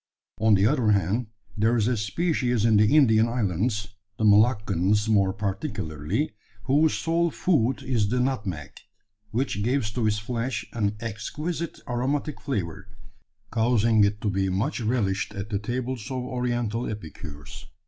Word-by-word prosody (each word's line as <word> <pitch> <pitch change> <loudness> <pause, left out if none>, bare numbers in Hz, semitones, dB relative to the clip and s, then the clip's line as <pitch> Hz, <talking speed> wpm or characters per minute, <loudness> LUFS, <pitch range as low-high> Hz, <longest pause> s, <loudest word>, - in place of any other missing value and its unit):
On 110 -1 +5
the 100 +1 +3
other 115 -4 +3
hand, 100 +5 0 0.3
there 110 +3 +2
is 110 -1 +2
a 125 - +2
species 120 - 0
in 110 -2 +5
the 105 +7 +4
Indian 115 -6 +5
islands 105 -1 -1 0.3
the 110 - -2
Moluccas 105 -2 +3
more 100 -3 +3
particularly 100 - -3 0.3
whose 145 +6 +3
sole 170 +1 +1
food 140 -6 +1
is 120 -6 +1
the 125 +3 +1
nutmeg, 100 - -2 0.6
which 115 -2 -1
gives 120 -2 0
to 115 0 0
its 105 0 +1
flesh 115 +1 -3
an 105 -3 0
exquisite 150 - -4
aromatic 135 +5 -2
flavour, 95 - -3 0.6
causing 115 -2 +3
it 100 +1 +1
to 105 - 0
be 95 0 0
much 95 +6 -1
relished 105 -3 -1
at 100 +2 -6
the 100 - 0
tables 120 +1 -4
of 130 -2 -3
Oriental 120 -2 -2
epicures. 75 -7 -9
110 Hz, 145 wpm, -26 LUFS, 100-125 Hz, 0.6 s, On